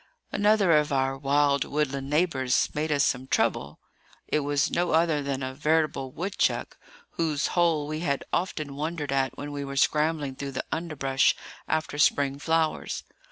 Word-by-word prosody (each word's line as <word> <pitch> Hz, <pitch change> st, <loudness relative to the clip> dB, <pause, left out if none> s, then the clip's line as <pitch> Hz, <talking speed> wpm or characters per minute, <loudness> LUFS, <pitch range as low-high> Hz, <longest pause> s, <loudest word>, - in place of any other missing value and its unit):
Another 205 Hz, -3 st, +3 dB
of 150 Hz, -2 st, +3 dB
our 135 Hz, -1 st, +1 dB
wild 140 Hz, +1 st, +2 dB
woodland 140 Hz, -2 st, -2 dB
neighbours 145 Hz, -5 st, +1 dB
made 155 Hz, +1 st, -1 dB
us 145 Hz, -1 st, +3 dB
some 130 Hz, -2 st, 0 dB
trouble. -, -, 0 dB, 0.5 s
It -, -, +1 dB
was 145 Hz, 0 st, 0 dB
no 175 Hz, -1 st, 0 dB
other 160 Hz, -2 st, +3 dB
than 140 Hz, -1 st, -3 dB
a 130 Hz, 0 st, -4 dB
veritable 150 Hz, -2 st, 0 dB
woodchuck, 185 Hz, +8 st, -1 dB, 0.4 s
whose 155 Hz, -3 st, 0 dB
hole 165 Hz, -4 st, +2 dB
we 155 Hz, +1 st, -3 dB
had 140 Hz, -5 st, -1 dB
often 155 Hz, -6 st, -2 dB
wondered 150 Hz, -1 st, -3 dB
at 135 Hz, -1 st, 0 dB
when 145 Hz, 0 st, -6 dB
we 145 Hz, -1 st, -4 dB
were 140 Hz, 0 st, -6 dB
scrambling 150 Hz, -1 st, +1 dB
through 140 Hz, 0 st, -6 dB
the 130 Hz, -, -3 dB
underbrush 140 Hz, -5 st, +1 dB, 0.3 s
after 155 Hz, -2 st, -1 dB
spring 140 Hz, -1 st, +2 dB
flowers. 160 Hz, +1 st, 0 dB
145 Hz, 160 wpm, -27 LUFS, 140-160 Hz, 0.5 s, Another